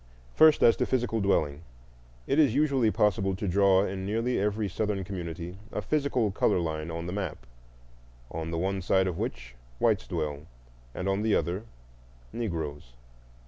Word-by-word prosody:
First, 155 -1 +6
as 115 - +7
to - - 0
physical 120 -3 0
dwelling. 75 -7 +1 0.6
It 140 - +1
is 140 -6 +4
usually 140 -6 +3
possible 95 -2 +1
to 100 +1 -4
draw 95 +1 +4
in 95 -1 -4
nearly 115 +5 0
every 105 +1 0
Southern 100 +1 -2
community 90 -1 -6
a - - -3
physical 140 -8 0
color 95 - +2
line 80 -1 -3
on 85 0 -4
the 90 - -4
map, 95 -11 -4 0.9
on 80 0 -4
the 85 - -3
one 95 +2 -1
side 95 +1 +2
of 90 -3 -3
which - - -4 0.2
whites - - +1
dwell 75 +1 -3 0.5
and 90 - -3
on 95 +1 +1
the 110 -1 +2
other 90 +7 -1 0.7
Negroes. 80 - -4
95 Hz, 160 wpm, -28 LUFS, 85-110 Hz, 0.9 s, as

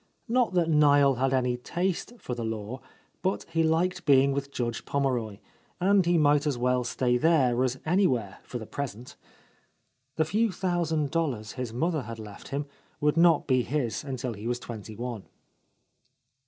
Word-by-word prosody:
Not 245 -3 +2
that 175 -2 +3
Niel 145 -4 +5
had 135 +1 +1
any 125 -2 +1
taste 175 - -2
for 130 - -5
the 120 -1 -4
law, 110 +2 -4 0.4
but 190 +1 -1
he 165 0 +1
liked 170 +3 +1
being 140 -1 +5
with 140 0 -2
Judge 120 -3 -3
Pommeroy, 125 -7 -1 0.4
and 195 +1 +4
he 175 0 +4
might 145 -1 +3
as 140 -4 0
well 125 +1 +1
stay 125 0 +1
there 130 -6 +3
as 130 0 0
anywhere, 135 - +1
for 125 - -7
the 110 - -7
present. 125 -2 -6 1.0
The 160 - +2
few 215 +6 +1
thousand 170 -6 -1
dollars 135 -10 -1
his 125 -3 -5
mother 155 +6 0
had 115 -1 -7
left 105 -2 -10
him 140 +1 -3 0.3
would 150 0 +2
not 165 -2 +5
be 130 -2 +3
his 125 -4 -2
until 130 -3 -4
he 105 +2 -7
was 120 0 0
twenty 110 -3 -8
one. 120 -2 -6
135 Hz, 165 wpm, -27 LUFS, 120-165 Hz, 1.0 s, Niel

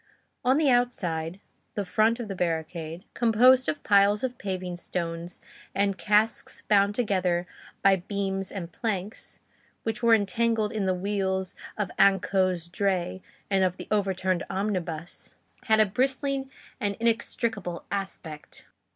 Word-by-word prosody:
On 260 +2 +4
the 300 -4 +4
outside, 180 -9 0 0.4
the 205 - -1
front 220 +5 +2
of 235 - -4
the 195 - -4
barricade, 165 0 -3
composed 250 +3 +5
of 295 - -3
piles 205 +1 +4
of 250 -2 -3
paving 185 -2 -3
stones 170 0 -4 0.4
and 200 0 +2
casks 210 +3 +1
bound 200 -1 +4
together 185 -6 +1 0.4
by 195 -1 +6
beams 195 0 -3
and 175 -4 -6
planks, 210 -2 -3 0.4
which 225 +1 -2
were 230 -1 +6
entangled 220 +1 +1
in 210 -4 -1
the 185 - +2
wheels 190 0 -1 0.2
of 205 -4 -2
Anceau's 185 -3 +3
dray 185 -1 -1 0.3
and 195 -1 +2
of 185 -1 +1
the - - -8
overturned 190 -3 +1
omnibus, 180 -5 -3 0.3
had 220 -1 +4
a 215 - +7
bristling 265 +5 0 0.3
and 205 -4 -1
inextricable 225 -5 -1
aspect. 185 -6 -5
200 Hz, 135 wpm, -27 LUFS, 180-220 Hz, 0.4 s, a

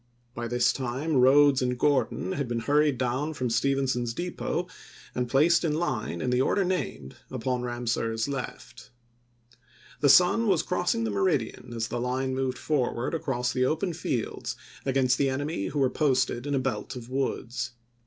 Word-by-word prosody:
By 120 -1 -4
this 120 0 +2
time 135 +4 -1
Rodes 135 +1 +6
and 125 -1 0
Gordon 130 -9 +1
had 140 +3 -2
been 120 -1 -2
hurried 145 +2 +2
down 130 +5 -1
from 125 -3 -2
Stephenson's 130 -2 0
Depot, 175 0 -2 0.5
and 125 -1 -2
placed 155 +8 +4
in 155 -3 +1
line, 120 - -2
in 125 - 0
the 125 +1 +3
order 195 +8 +2
named, 175 - -3
upon 125 +1 -2
Ramseur's 120 -2 -1
left. 130 -2 -6 1.1
The 145 - +4
sun 180 - +6
was 185 -6 +3
crossing 175 -10 0
the 110 - -1
meridian 100 +4 -1
as 110 -1 -2
the 120 +1 -3
line 130 +1 -1
moved 130 -1 -1
forward 130 -2 -1
across 135 -6 -1
the 130 0 +2
open 170 +6 0
fields 130 -8 -3 0.3
against 130 -1 +2
the 140 - +3
enemy 135 -6 -2
who 145 - -4
were 135 -2 +4
posted 135 -3 +1
in 145 - 0
a - - +2
belt 130 0 -3
of 120 -2 -8
woods. 130 -1 -2
130 Hz, 165 wpm, -27 LUFS, 120-145 Hz, 1.1 s, Rodes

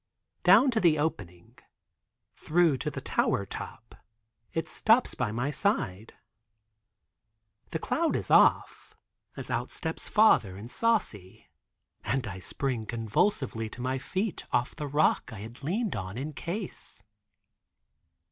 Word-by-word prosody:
Down 220 +9 +6
to 225 - +1
the 170 -5 +4
opening, 100 - -4 0.7
through 165 -3 +2
to - - -3
the - - -6
tower 100 - 0
top 110 +3 -9 0.6
it 165 -1 -2
stops 230 +3 +3
by 105 - -2
my 125 +6 -1
side. 115 - -1 1.5
The - - -2
cloud 325 - 0
is - - -3
off, - - +3 0.4
as - - -6
out - - -1
steps - - -4
father 160 - +4
and 115 +5 -9
Saucy, 110 - -1 0.5
and 130 0 -1
I 95 -3 -6
spring 120 +2 -3
convulsively 115 - 0
to 120 - -10
my 130 +1 -1
feet 190 +7 -3
off 125 0 0
the 150 -2 -4
rock 145 -2 +2
I 105 -3 -8
had 115 +5 -10
leaned 200 - -1
on 95 +2 -5
in 145 +4 -4
case. 180 +7 -6
135 Hz, 130 wpm, -28 LUFS, 110-180 Hz, 1.5 s, Down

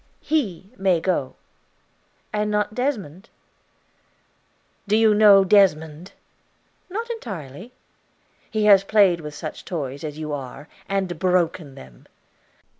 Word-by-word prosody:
"He 205 - -2
may 190 -3 +2
go." 160 -7 -2 1.0
"And 210 0 -1
not 210 0 -1
Desmond?" 215 - -4 1.6
"Do 205 - +2
you 220 -1 +4
know 205 -2 +7
Desmond?" 175 -4 +2 0.8
"Not 450 +5 -4
entirely." 190 - -8 0.8
"He 215 -1 -1
has 200 -2 +6
played 195 -5 +3
with 150 -1 -8
such 155 +1 -7
toys 140 -5 -5
as 150 -1 -6
you 155 -1 -5
are, 140 +1 -7 0.2
and 190 -4 -2
broken 175 -5 0
them." 65 -2 -15
185 Hz, 115 wpm, -22 LUFS, 155-210 Hz, 1.6 s, know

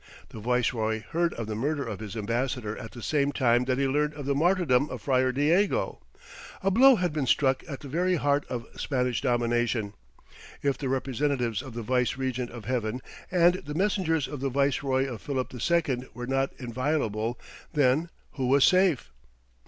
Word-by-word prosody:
The - - -9
viceroy 110 -2 0
heard 170 +1 +1
of 115 - -4
the 110 - -4
murder 140 +5 -1
of 105 -4 -5
his 110 -1 -7
ambassador 115 0 -2
at 115 - -8
the 120 - -9
same 145 -2 +1
time 125 -3 +2
that 130 0 0
he 135 0 +1
learned 150 +2 0
of 145 -2 -7
the 140 - +1
martyrdom 155 -3 +2
of - - -7
Friar 130 -1 +2
Diego. 160 +10 +1 0.6
A 195 - +2
blow 265 +6 +7
had 180 -6 -1
been 145 -4 -1
struck 135 -1 +3
at 140 - -6
the 145 - -8
very 180 +6 +1
heart 145 -2 +1
of 120 -2 -4
Spanish 125 -3 -1
domination; 120 -4 0 0.7
if 140 -1 +2
the 135 - -4
representatives 130 -3 -1
of 130 -4 -10
the 120 - -4
Vice 125 +1 +1
Regent 130 -2 -2
of 120 -4 -9
Heaven 120 0 -2 0.3
and 175 0 +3
the 150 +1 -6
messengers 180 -5 +1
of 145 - -6
the 135 +1 -1
viceroy 135 0 +1
of 125 -5 -6
Philip 130 -3 -3
II 130 -1 0
were 125 +1 -5
not 135 +1 0
inviolable, 120 -3 -2 0.3
then 150 +2 +2 0.2
who 130 -3 -2
was 135 +1 +5
safe? 185 - +3
130 Hz, 180 wpm, -27 LUFS, 120-150 Hz, 0.7 s, blow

